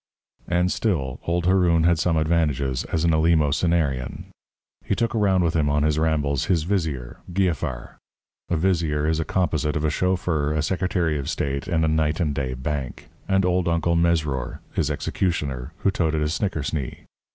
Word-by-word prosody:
And 90 +1 +1
still, 70 - -1
old 85 0 0
Haroun 90 -3 +3
had 85 -1 +3
some 85 0 +1
advantages 75 -5 0
as 80 - -1
an 85 - +3
eleemosynarian. 80 -3 +1 0.5
He - - -1
took 115 -1 0
around 100 -5 +2
with 85 -1 0
him 75 -3 +2
on 75 0 +2
his 75 0 +1
rambles 75 -4 +1
his 85 -5 +1
vizier, 80 -10 -2
Giafar 90 -5 -2 0.5
(a 85 - +1
vizier 80 -4 +1
is 80 0 +1
a 80 - -1
composite 80 -4 0
of 75 0 0
a 75 - +2
chauffeur, 85 -4 0
a 75 -1 0
secretary 85 -3 0
of 70 - -4
state, 70 0 -2
and 80 -2 +1
a - - +2
night 80 0 +1
and 75 -5 0
day 65 -2 -2
bank), 65 0 -4 0.2
and 95 -1 +3
old 90 -1 +1
Uncle 85 0 +1
Mesrour, 80 -6 0
his - - 0
executioner, 70 -7 -2
who 100 - +3
toted 80 -4 0
a 75 - 0
snickersnee. 80 - -3
80 Hz, 170 wpm, -24 LUFS, 75-85 Hz, 0.5 s, Haroun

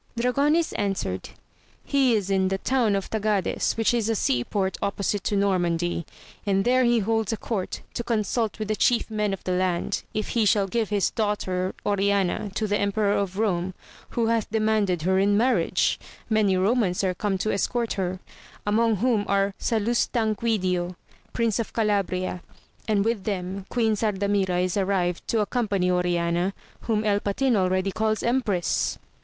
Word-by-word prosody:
Dragonis 285 +7 +2
answered. 195 - -2 0.6
He 265 -4 +3
is 200 -2 -1
in 190 -1 +2
the 195 0 0
town 235 -2 +1
of 195 - -3
Tagades, 210 -3 0
which 225 +1 +2
is 230 -2 0
a 225 - +1
sea 125 - +1
port 190 +6 -1
opposite 200 0 -1
to 205 - 0
Normandy: 175 -4 0 0.4
and 195 -1 +1
there 255 +1 +4
he 240 -1 +3
holds 225 0 0
a 225 - -1
court, 205 -5 -3
to 235 - -3
consult 225 -1 -1
with 215 -2 -4
the 215 - +1
chief 235 +1 +2
men 210 -1 0
of 195 - -5
the 185 - -2
land, 180 -1 0
if 215 - -3
he 230 - +1
shall 205 -1 +3
give 220 +2 -1
his 205 -2 +1
daughter 190 -4 -1
Oriana 200 0 +1
to 220 - 0
the 205 0 0
Emperor 200 0 +1
of 195 -2 -1
Kome, 185 -4 0 0.3
who 235 - 0
hath 225 -1 0
demanded 215 -6 +1
her 190 +2 +2
in 200 +1 +3
marriage; 250 +4 +2 0.3
many 210 -3 +3
Eomans 195 -1 +1
are 185 -1 +1
come 195 +1 -1
to 215 +4 -1
escort 235 +3 0
her, 185 -1 -2 0.5
among 220 +2 +2
whom 225 0 +1
are 200 0 +1
Salustanquidio, 215 -5 0 0.4
Prince 230 -2 0
of 230 - -3
Calabria, 195 -4 0 0.5
and 210 -2 +2
with 225 -4 -1
them 190 -1 -3
Queen 225 -3 +1
Sardamira 200 -3 0
is 180 -1 -1
arrived 185 -3 0
to 225 - +1
accompany 200 -4 0
Oriana, 175 +1 0 0.3
whom 220 -2 +1
El 205 -1 +2
Patin 240 +5 +1
already 185 0 +1
calls 215 +1 0
empress. 230 -8 0
205 Hz, 165 wpm, -25 LUFS, 190-225 Hz, 0.6 s, there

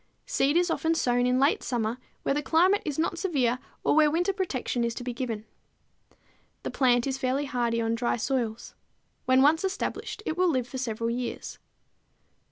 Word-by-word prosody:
Seed 285 +4 +2
is 350 -1 +2
often 325 0 +1
sown 245 -4 +2
in 250 +1 +2
late 280 +2 +3
summer 235 0 -2 0.2
where - - +1
the 295 - 0
climate 360 +8 +3
is 295 -4 -3
not 335 +1 -1
severe 255 -10 +1 0.2
or - - +3
where 310 -1 +6
winter 350 +5 +1
protection 270 - -2
is 235 0 -1
to - - -6
be 245 0 -3
given. 230 -4 -4 1.2
The - - -3
plant 245 -3 +3
is 270 -1 -2
fairly 265 +2 0
hardy 240 -3 0
on 225 0 0
dry 235 +1 0
soils. 235 -2 -2 0.5
When 260 +1 +5
once 315 +4 +4
established 395 +2 -3
it 315 - -1
will 365 0 +3
live 255 -6 0
for 260 +1 -6
several 230 -2 -2
years. 240 0 -5
260 Hz, 180 wpm, -27 LUFS, 240-320 Hz, 1.2 s, where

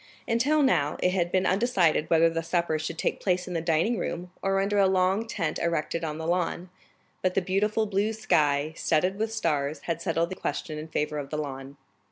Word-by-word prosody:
Until 275 +6 +2
now, 150 - +2
it 180 - +3
had 175 -2 0
been 190 0 +2
undecided 185 -7 +2
whether 165 0 +5
the 165 0 -1
supper 165 -1 0
should 155 +1 -4
take - - -1
place 180 -1 0
in 180 - -5
the 165 - -1
dining 165 +8 +1
room, 175 +1 -4
or 195 0 +1
under 200 +1 +1
a 195 - +5
long 190 +4 +2
tent 165 -8 -2
erected 170 0 -1
on 155 -1 -3
the 160 - -5
lawn, 175 +1 -1 0.5
but 185 -1 0
the - - +4
beautiful 205 +4 0
blue 205 +1 0
sky, 155 -8 +1
studded 180 +6 +1
with 220 0 -1
stars, 150 -8 -1
had 170 -1 -3
settled 170 -1 0
the - - -3
question 155 -3 -4
in 155 - -7
favor 150 -1 -2
of 140 -1 -6
the 150 - -3
lawn. 140 -2 -6
175 Hz, 210 wpm, -27 LUFS, 155-195 Hz, 0.5 s, whether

